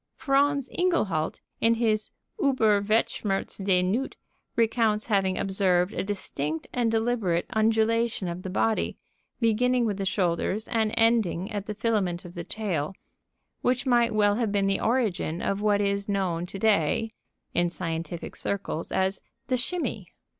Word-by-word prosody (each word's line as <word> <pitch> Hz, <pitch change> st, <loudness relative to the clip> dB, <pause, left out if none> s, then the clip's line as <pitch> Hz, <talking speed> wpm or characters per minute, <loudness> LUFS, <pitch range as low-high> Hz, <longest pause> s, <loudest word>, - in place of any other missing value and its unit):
Franz 280 Hz, 0 st, +2 dB
Ingehalt, 215 Hz, -, 0 dB, 0.2 s
in 230 Hz, 0 st, +4 dB
his 220 Hz, -2 st, +1 dB, 0.3 s
"Über 225 Hz, -, +3 dB
Weltschmerz 205 Hz, -2 st, 0 dB
des 185 Hz, -2 st, +3 dB
Newt," 230 Hz, +9 st, -1 dB, 0.4 s
recounts 225 Hz, -2 st, +2 dB
having 195 Hz, -4 st, +1 dB
observed 190 Hz, -1 st, +1 dB
a -, -, -1 dB
distinct 160 Hz, -6 st, -3 dB
and 240 Hz, -2 st, +1 dB
deliberate 225 Hz, -6 st, +1 dB
undulation 225 Hz, -1 st, +2 dB
of 170 Hz, +1 st, -4 dB
the 190 Hz, -, -5 dB
body, 220 Hz, +4 st, 0 dB, 0.4 s
beginning 245 Hz, +2 st, +2 dB
with 205 Hz, -3 st, -1 dB
the 195 Hz, -, -2 dB
shoulders 185 Hz, +2 st, 0 dB
and 220 Hz, -2 st, +1 dB
ending 225 Hz, -4 st, +2 dB
at 205 Hz, -1 st, -4 dB
the 210 Hz, -, -4 dB
filament 200 Hz, -6 st, 0 dB
of 175 Hz, -, -9 dB
the 175 Hz, -2 st, -5 dB
tail, 185 Hz, -4 st, -2 dB, 0.7 s
which 250 Hz, +1 st, +1 dB
might 240 Hz, -2 st, +3 dB
well 205 Hz, -1 st, +3 dB
have 230 Hz, -4 st, 0 dB
been 200 Hz, -1 st, +1 dB
the 195 Hz, 0 st, +1 dB
origin 215 Hz, -9 st, 0 dB
of 200 Hz, +2 st, -1 dB
what 210 Hz, -1 st, +3 dB
is 200 Hz, 0 st, 0 dB
known 180 Hz, -4 st, -1 dB
to 195 Hz, -, -7 dB
day 215 Hz, +1 st, +2 dB, 0.4 s
in 175 Hz, 0 st, +2 dB
scientific 165 Hz, -1 st, -5 dB
circles 195 Hz, -5 st, -3 dB
as 190 Hz, +1 st, 0 dB, 0.3 s
"the 255 Hz, -, +3 dB
shimmy." 335 Hz, +8 st, -2 dB
205 Hz, 145 wpm, -27 LUFS, 185-230 Hz, 0.7 s, in